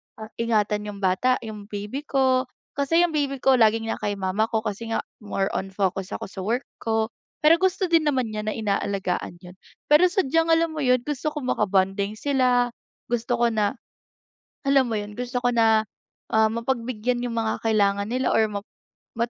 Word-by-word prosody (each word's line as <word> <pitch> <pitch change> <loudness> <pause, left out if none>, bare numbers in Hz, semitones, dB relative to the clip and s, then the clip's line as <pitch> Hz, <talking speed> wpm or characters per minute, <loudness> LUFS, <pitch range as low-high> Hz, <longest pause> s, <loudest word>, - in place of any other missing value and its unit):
ah, 220 0 -10
ingatan 210 -2 0
'yung 200 -1 -8
bata, 190 +8 +3
'yung 210 -2 -8
baby 210 +8 -6
ko, 260 -2 +2 0.2
kasi 330 +5 +2
'yung 345 - +1
baby 285 -2 0
ko 265 -2 +5
laging 225 0 +3
na - - -4
kay 205 -1 -2
mama 195 +3 0
ko 220 -1 -1
kasi 215 +1 -4
nga - - -1 0.2
more 195 -2 -2
on 195 - -2
focus 195 -1 -1
ako - - -6
sa 195 - -8
work 230 +7 -1 0.2
ko, 225 0 0 0.3
pero 330 +3 +6
gusto 380 +1 +1
din 320 -2 +4
naman 255 -6 0
niya 215 0 -4
na 215 - -1
inaalagaan 200 -4 -2
'yon. 180 +2 -13 0.3
Pero 335 +5 +7
sadyang 330 -3 +1
alam 330 0 +3
mo 310 - -5
'yon, 255 -3 +2
gusto 300 +1 -3
ko 295 - -4
makabonding 200 -2 +1
sila, 250 -2 +2 0.4
gusto 240 +1 0
ko 235 0 +2
na 215 +3 0 0.9
alam 270 -3 +3
mo 220 - -1
'yun, 205 0 -5
gusto 245 +2 -4
ko 245 0 +1
na, 220 -1 +4 0.5
ah, 220 0 +4
mapagbigyan 240 0 -2
'yung 235 -2 -3
mga 225 -1 -1
kailangan 205 -2 +1
nila 255 +2 0
or 225 - +4
map 205 0 -5 0.5
mat 235 +1 -1
230 Hz, 185 wpm, -24 LUFS, 210-260 Hz, 0.9 s, Pero